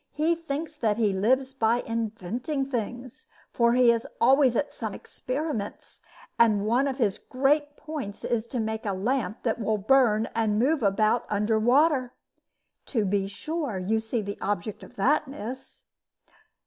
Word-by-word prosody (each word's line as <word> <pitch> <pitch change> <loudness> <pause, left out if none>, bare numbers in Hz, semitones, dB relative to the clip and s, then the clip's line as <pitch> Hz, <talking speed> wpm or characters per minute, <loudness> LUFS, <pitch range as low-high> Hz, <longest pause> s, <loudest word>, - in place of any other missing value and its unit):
He 315 +3 +2
thinks 325 -1 -5
that 220 -5 +1
he 215 -4 +2
lives 260 +7 +1
by 235 -2 +2
inventing 230 - -3
things, 245 +1 -5 0.3
for 235 0 +3
he 245 -1 +6
is 230 -1 -1
always 260 0 +5
at 285 - -1
some 220 -4 -5
experiments, 255 -6 -5 0.4
and 215 -3 +4
one 245 +6 +2
of 270 -1 -2
his 215 -7 0
great 290 +2 0
points 285 -10 -6
is 235 -1 -1
to 245 - -3
make 220 0 -2
a 205 -3 -1
lamp 220 +3 -2
that 230 -1 0
will 215 0 +1
burn 220 0 +3
and 220 -2 +1
move 280 +6 +2
about 215 +3 +2
under 210 +2 +1
water. 255 +2 +3 0.7
To 225 -6 0
be 195 0 0
sure 285 - -4
you 205 +5 0
see 220 0 -3
the 200 0 -6
object 205 0 -3
of - - -13
that, 290 +8 +2
miss?" 265 -1 -8
235 Hz, 160 wpm, -26 LUFS, 215-270 Hz, 0.7 s, he